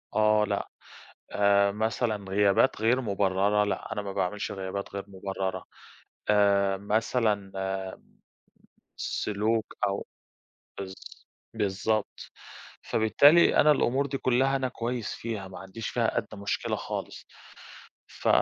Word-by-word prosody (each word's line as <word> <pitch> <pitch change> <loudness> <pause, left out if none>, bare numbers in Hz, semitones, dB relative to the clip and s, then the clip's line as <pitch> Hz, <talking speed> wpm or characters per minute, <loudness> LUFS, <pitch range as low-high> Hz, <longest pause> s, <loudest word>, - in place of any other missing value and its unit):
آه، 105 0 +4
لأ. - - -2 0.6
آآ 100 0 +4
مثلًا 110 0 -1
غيابات 100 +5 +3
غير 125 +4 +3
مُبررَة، 100 -1 +2
لأ 105 +1 -3
أنا 105 - -3
ما 100 -1 -6
باعملش 95 +4 -2
غيابات 95 +1 -5
غير 100 - -3
مُبررَة، 95 -1 -4 0.6
آآ 100 -1 +3
مثلًا 105 -1 0 1.5
سلوك 110 +2 -1
أو 100 0 -3 0.7
بالض 95 -1 -6 0.6
بالضبط. 105 0 -2 0.5
فبالتالي 145 +9 +5
أنا 150 - +6
الأمور 140 0 +1
دي 135 0 -3
كلها 130 +2 +2
أنا 130 -1 -1
كويس 120 -2 -3
فيها، 110 -4 -5
ما 95 - -9
عنديش 95 +4 -7
فيها 115 -2 0
أدنى 105 - -6
مُشكلة 100 - -1
خالص. - - -6 0.8
ف - - -4
105 Hz, 115 wpm, -28 LUFS, 100-115 Hz, 1.5 s, أنا